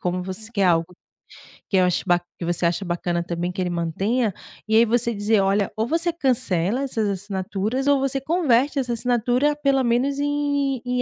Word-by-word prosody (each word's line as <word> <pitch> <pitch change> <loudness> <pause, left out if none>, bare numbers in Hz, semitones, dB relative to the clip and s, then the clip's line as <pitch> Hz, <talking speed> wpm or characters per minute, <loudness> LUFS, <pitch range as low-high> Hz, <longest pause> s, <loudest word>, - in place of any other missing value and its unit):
como 180 0 -2
você 190 +4 -7
quer 200 -4 +1
algo 170 0 +2 0.8
que - - -1
eu 185 - +5
acho 180 - 0
ba 175 -1 +4 0.2
que 170 - -4
você 175 0 -1
acha 175 +3 0
bacana 175 0 -1
também 175 +1 -3
que 180 - -8
ele 180 - -1
mantenha, 195 +7 -1 0.3
e 220 - +1
aí, 230 - +6
você 235 +1 +1
dizer: 205 0 +2
"Olha, 195 +1 +1
ou 220 - 0
você 335 +2 0
cancela 240 - 0
essas 225 -6 -1
assinaturas 200 +5 -3
ou 285 -1 +4
você 270 0 -1
converte 285 -3 +2
essa 245 -3 -1
assinatura 245 +4 +1
pelo 275 -2 +2
menos 255 +4 +1
em 285 -3 0
em 250 0 0
225 Hz, 190 wpm, -23 LUFS, 185-270 Hz, 0.8 s, aí